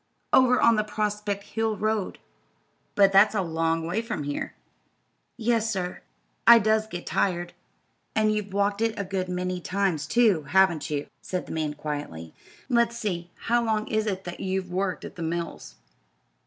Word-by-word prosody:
"Over 255 Hz, -1 st, +5 dB
on 230 Hz, -1 st, +5 dB
the 215 Hz, -, +2 dB
Prospect 210 Hz, -1 st, -2 dB
Hill 225 Hz, -1 st, -2 dB
road." 215 Hz, -2 st, -1 dB, 0.8 s
"But 195 Hz, -1 st, +5 dB
that's 200 Hz, +3 st, +6 dB
a 195 Hz, -, +1 dB
long 165 Hz, -1 st, 0 dB
way 180 Hz, +7 st, -1 dB
from 230 Hz, -10 st, -4 dB
here." 145 Hz, 0 st, -4 dB, 0.8 s
"Yes, 230 Hz, -1 st, +1 dB
sir. 180 Hz, -3 st, -3 dB, 0.5 s
I 235 Hz, -, +11 dB
does 220 Hz, 0 st, +2 dB
get 175 Hz, -5 st, -7 dB
tired." 175 Hz, -2 st, -1 dB, 0.6 s
"And 215 Hz, 0 st, +3 dB
you've 210 Hz, -2 st, -3 dB
walked 200 Hz, +1 st, 0 dB
it 225 Hz, -1 st, 0 dB
a 200 Hz, -, -1 dB
good 185 Hz, -1 st, -3 dB
many 180 Hz, 0 st, -2 dB
times, 185 Hz, -5 st, -1 dB
too; 220 Hz, -9 st, +3 dB
haven't 190 Hz, -4 st, +3 dB
you?" 145 Hz, -1 st, -2 dB, 0.2 s
said 185 Hz, -1 st, -4 dB
the -, -, -9 dB
man, 155 Hz, -2 st, -2 dB
quietly. 145 Hz, -, -6 dB, 0.3 s
"Let's 235 Hz, -2 st, +2 dB
see, 175 Hz, -6 st, -3 dB
how 240 Hz, +1 st, +2 dB
long 215 Hz, -2 st, 0 dB
is 215 Hz, -1 st, 0 dB
it 190 Hz, -2 st, -2 dB
that 175 Hz, 0 st, -7 dB
you've 190 Hz, -1 st, -2 dB
worked 185 Hz, +1 st, -2 dB
at -, -, -10 dB
the -, -, -6 dB
mills?" 165 Hz, -, -4 dB
195 Hz, 170 wpm, -26 LUFS, 175-215 Hz, 0.8 s, I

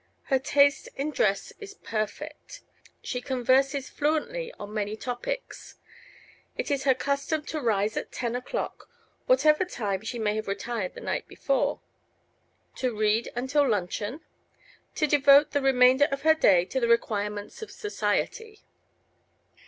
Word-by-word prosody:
Her 265 Hz, -, +5 dB
taste 285 Hz, 0 st, +3 dB
in 285 Hz, +3 st, -2 dB
dress 200 Hz, -8 st, 0 dB
is 410 Hz, -1 st, -10 dB
perfect. 220 Hz, -, -5 dB, 0.4 s
She 250 Hz, -, -3 dB
converses 265 Hz, +2 st, +1 dB
fluently 475 Hz, +12 st, -1 dB
on 205 Hz, -, -9 dB
many 210 Hz, 0 st, -2 dB
topics. 255 Hz, -, -5 dB, 0.8 s
It -, -, -3 dB
is 275 Hz, -1 st, -1 dB
her 265 Hz, -2 st, +5 dB
custom 280 Hz, +3 st, -1 dB
to 310 Hz, -, -4 dB
rise 215 Hz, -3 st, +1 dB
at -, -, -4 dB
ten 240 Hz, -1 st, -3 dB
o'clock, 250 Hz, -, -5 dB, 0.4 s
whatever 310 Hz, -10 st, +4 dB
time 205 Hz, -, -3 dB
she 225 Hz, +2 st, -5 dB
may 215 Hz, -2 st, 0 dB
have 215 Hz, -, -4 dB
retired 200 Hz, 0 st, -3 dB
the -, -, -9 dB
night -, -, -3 dB
before; 275 Hz, -1 st, -1 dB, 1.0 s
to 250 Hz, -4 st, -2 dB
read 215 Hz, +2 st, +1 dB
until 270 Hz, +3 st, +1 dB
luncheon; 210 Hz, -, -2 dB, 0.7 s
to 305 Hz, -, +2 dB
devote 290 Hz, 0 st, +5 dB
the 285 Hz, -, 0 dB
remainder 260 Hz, +1 st, +5 dB
of 275 Hz, 0 st, -4 dB
her 315 Hz, 0 st, +6 dB
day 185 Hz, -, +4 dB
to 265 Hz, -, -2 dB
the 235 Hz, -, +1 dB
requirements 210 Hz, -, -1 dB
of 440 Hz, -, -7 dB
society. 430 Hz, +1 st, -3 dB
265 Hz, 140 wpm, -27 LUFS, 220-300 Hz, 1.0 s, her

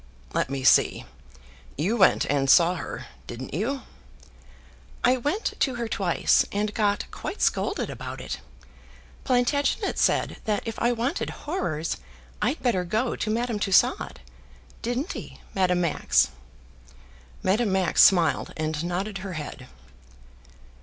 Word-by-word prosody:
"Let -, -, 0 dB
me 135 Hz, -1 st, -3 dB
see, 130 Hz, -, +4 dB, 0.7 s
you 180 Hz, -, +1 dB
went 195 Hz, -5 st, +4 dB
and 140 Hz, -1 st, +1 dB
saw 170 Hz, +4 st, +6 dB
her, 180 Hz, -, -6 dB, 0.2 s
didn't 120 Hz, +2 st, -7 dB
you?" 245 Hz, -, -2 dB, 1.2 s
"I 255 Hz, +1 st, +4 dB
went 290 Hz, -, -1 dB
to 260 Hz, -3 st, +1 dB
her 235 Hz, -1 st, -3 dB
twice, 190 Hz, -5 st, +2 dB
and 210 Hz, +1 st, -1 dB
got 205 Hz, -2 st, +1 dB
quite -, -, -6 dB
scolded -, -, 0 dB
about -, -, -7 dB
it. -, -, -5 dB, 0.9 s
Plantagenet 255 Hz, +3 st, +1 dB
said -, -, +2 dB
that 210 Hz, -2 st, 0 dB
if 225 Hz, -1 st, -5 dB
I 240 Hz, -, +2 dB
wanted 245 Hz, +8 st, -1 dB, 0.2 s
horrors 165 Hz, -, -2 dB, 0.4 s
I'd 250 Hz, +9 st, 0 dB
better 220 Hz, -8 st, +2 dB
go 220 Hz, +8 st, -1 dB
to 215 Hz, -, -2 dB
Madame 230 Hz, 0 st, -1 dB
Tussaud. 195 Hz, -3 st, +2 dB, 0.7 s
Didn't 245 Hz, +8 st, -2 dB
he, -, -, -8 dB
Madame 180 Hz, -2 st, +2 dB
Max?" 170 Hz, -4 st, +2 dB, 1.1 s
Madame 210 Hz, +2 st, +2 dB
Max 190 Hz, -3 st, +4 dB
smiled 175 Hz, -4 st, +4 dB
and 155 Hz, 0 st, -2 dB
nodded 190 Hz, +4 st, -3 dB
her 190 Hz, 0 st, -6 dB
head. 145 Hz, -4 st, -7 dB
205 Hz, 130 wpm, -26 LUFS, 175-240 Hz, 1.2 s, saw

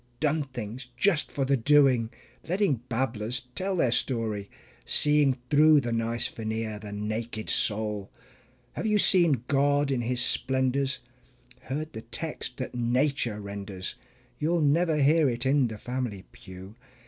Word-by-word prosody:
"Done 150 Hz, 0 st, +1 dB
things" 125 Hz, -1 st, -7 dB
just 160 Hz, +1 st, +1 dB
for 135 Hz, -, -1 dB
the 140 Hz, +1 st, +2 dB
doing, 130 Hz, -2 st, +4 dB, 0.4 s
letting 185 Hz, -6 st, +2 dB
babblers 120 Hz, -1 st, -2 dB
tell 190 Hz, +5 st, -2 dB
the 130 Hz, -9 st, +2 dB
story, 110 Hz, -5 st, -1 dB, 0.3 s
Seeing 150 Hz, -3 st, +3 dB
through 150 Hz, +1 st, +6 dB
the 120 Hz, -, -3 dB
nice 115 Hz, +1 st, -1 dB
veneer 110 Hz, -2 st, -4 dB
the 105 Hz, -1 st, -9 dB
naked 110 Hz, +2 st, -3 dB
soul? 105 Hz, -2 st, 0 dB, 0.6 s
Have -, -, -3 dB
you 210 Hz, -1 st, +3 dB
seen 170 Hz, -, +4 dB
God 145 Hz, 0 st, +2 dB
in 130 Hz, -3 st, 0 dB
His 125 Hz, +1 st, -1 dB
splendors, 130 Hz, +1 st, 0 dB, 0.7 s
heard 155 Hz, +4 st, -4 dB
the 110 Hz, -, -6 dB
text 125 Hz, +2 st, -6 dB
that 130 Hz, -, -5 dB
nature 120 Hz, -1 st, 0 dB
renders? 100 Hz, -2 st, -6 dB, 0.5 s
(You'll 165 Hz, +2 st, +1 dB
never 155 Hz, +2 st, +2 dB
hear 150 Hz, +1 st, +4 dB
it 120 Hz, +1 st, -3 dB
in 135 Hz, -1 st, +3 dB
the 110 Hz, -1 st, -7 dB
family 120 Hz, -4 st, -4 dB
pew). 95 Hz, +1 st, -12 dB
125 Hz, 140 wpm, -27 LUFS, 110-145 Hz, 0.7 s, through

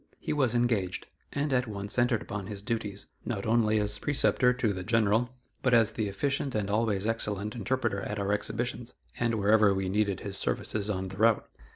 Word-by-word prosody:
He -, -, -3 dB
was 130 Hz, -5 st, +2 dB
engaged, 115 Hz, -7 st, 0 dB, 0.3 s
and 140 Hz, 0 st, -1 dB
at 125 Hz, -1 st, +2 dB
once 100 Hz, +2 st, -2 dB
entered 120 Hz, -2 st, +2 dB
upon 100 Hz, -2 st, -5 dB
his 100 Hz, -1 st, -6 dB
duties, 105 Hz, -3 st, -3 dB, 0.2 s
not 100 Hz, -5 st, -3 dB
only 110 Hz, -1 st, +3 dB
as 105 Hz, 0 st, -1 dB
preceptor 135 Hz, -3 st, +3 dB
to 125 Hz, -4 st, 0 dB
the 95 Hz, -, -5 dB
General, 115 Hz, +3 st, +2 dB, 0.3 s
but 125 Hz, -2 st, +3 dB
as 115 Hz, -2 st, +4 dB
the 110 Hz, -1 st, -2 dB
efficient 135 Hz, +6 st, -1 dB
and 100 Hz, -2 st, -1 dB
always 105 Hz, -2 st, +1 dB
excellent 105 Hz, -2 st, 0 dB
interpreter 120 Hz, -2 st, -1 dB
at 105 Hz, +2 st, -4 dB
our 100 Hz, 0 st, 0 dB
exhibitions, 120 Hz, +3 st, -3 dB, 0.2 s
and 120 Hz, -1 st, +1 dB
wherever 105 Hz, -1 st, +4 dB
we 95 Hz, -1 st, -1 dB
needed 100 Hz, -1 st, 0 dB
his 100 Hz, -1 st, -5 dB
services 105 Hz, -1 st, -1 dB
on 95 Hz, -2 st, -2 dB
the 95 Hz, -, -9 dB
route. 110 Hz, +1 st, +3 dB
110 Hz, 190 wpm, -29 LUFS, 100-120 Hz, 0.3 s, as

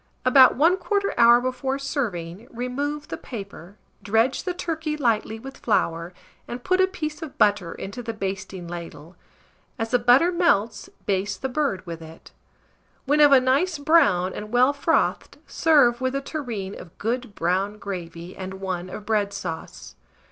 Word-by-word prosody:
About 255 Hz, 0 st, +7 dB
1/4 375 Hz, +6 st, +2 dB
hour 235 Hz, +1 st, +7 dB
before 255 Hz, +2 st, -2 dB
serving, 215 Hz, -, -4 dB
remove 280 Hz, +5 st, -4 dB
the -, -, -4 dB
paper, 200 Hz, -, -9 dB, 0.2 s
dredge 225 Hz, -, +1 dB
the 365 Hz, -, -1 dB
turkey 320 Hz, -3 st, -3 dB
lightly 225 Hz, -5 st, 0 dB
with 270 Hz, +4 st, -10 dB
flour, 170 Hz, -6 st, 0 dB, 0.4 s
and 245 Hz, +1 st, -7 dB
put 370 Hz, 0 st, +2 dB
a 375 Hz, -, +4 dB
piece 310 Hz, -4 st, -5 dB
of 315 Hz, -4 st, -8 dB
butter 205 Hz, -5 st, +2 dB
into 200 Hz, +6 st, -7 dB
the 230 Hz, -, -4 dB
basting 195 Hz, -3 st, -5 dB
ladle; 170 Hz, -1 st, -9 dB, 0.6 s
as 225 Hz, -2 st, -3 dB
the 245 Hz, -, +3 dB
butter 245 Hz, +9 st, +5 dB
melts, 335 Hz, -, +1 dB, 0.2 s
baste 195 Hz, 0 st, -1 dB
the 265 Hz, -, -1 dB
bird 250 Hz, -9 st, -1 dB
with 165 Hz, -1 st, -7 dB
it. 160 Hz, 0 st, -13 dB, 0.7 s
When 290 Hz, +2 st, +2 dB
of 295 Hz, -1 st, +7 dB
a 270 Hz, -, +8 dB
nice 280 Hz, +7 st, +1 dB
brown 205 Hz, -, +3 dB
and 210 Hz, 0 st, -7 dB
well 250 Hz, +3 st, +4 dB
frothed, 305 Hz, +3 st, 0 dB
serve 275 Hz, -7 st, +3 dB
with 260 Hz, +1 st, -1 dB
a 275 Hz, -, -1 dB
tureen 235 Hz, -10 st, -5 dB
of 170 Hz, -, -13 dB
good 235 Hz, -1 st, -3 dB
brown 190 Hz, +5 st, 0 dB
gravy 175 Hz, -3 st, -7 dB
and 190 Hz, 0 st, -6 dB
one 185 Hz, -2 st, -4 dB
of 205 Hz, -, -8 dB
bread 205 Hz, -2 st, +1 dB
sauce. 160 Hz, -, -7 dB
235 Hz, 160 wpm, -24 LUFS, 190-280 Hz, 0.7 s, a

